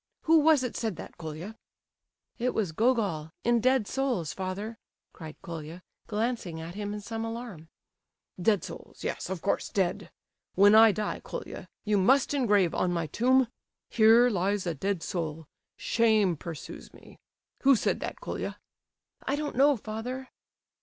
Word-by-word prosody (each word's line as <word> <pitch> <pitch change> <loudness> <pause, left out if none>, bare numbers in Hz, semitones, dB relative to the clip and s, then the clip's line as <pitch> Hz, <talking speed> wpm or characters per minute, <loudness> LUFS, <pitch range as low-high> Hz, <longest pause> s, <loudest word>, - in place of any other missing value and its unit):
Who 325 0 +5
was 305 -3 +4
it 250 - -3
said 220 -5 -2
that, - - -10
Colia?" 165 +6 -7 0.8
"It 250 +1 0
was 200 -7 0
Gogol, 200 -6 +1
in 240 0 +3
Dead 255 -1 +3
Souls, 255 - -1
father," 200 +4 -5 0.3
cried 155 -2 -9
Colia, 165 +1 -7 0.2
glancing 215 -6 -2
at 165 +2 -7
him 205 +1 -4
in 210 0 -5
some 225 +2 -5
alarm. 225 -8 -7 0.7
"'Dead 205 0 +3
Souls,' - - -10
yes, - - -3
of 190 -3 -4
course, 200 - 0
dead. 190 -3 -1 0.5
When 200 +2 +6
I 220 0 +8
die, 210 +1 -3
Colia, - - -7 0.2
you 210 -1 +2
must 265 +9 +3
engrave 205 - +3
on 180 - +1
my 170 -2 -1
tomb: 255 - +3 0.4
"'Here 230 +2 +6
lies 195 0 0
a 170 - -1
Dead 190 +3 -2
Soul, 160 -3 -4 0.3
Shame 220 -6 +2
pursues 160 0 -8
me.' - - -16 0.4
"Who 275 0 +6
said - - 0
that, - - -5
Colia?" - - -5 0.6
"I 275 - -1
don't 295 0 -4
know, 280 +1 +5
father." 245 +5 -6
210 Hz, 155 wpm, -28 LUFS, 175-245 Hz, 0.8 s, I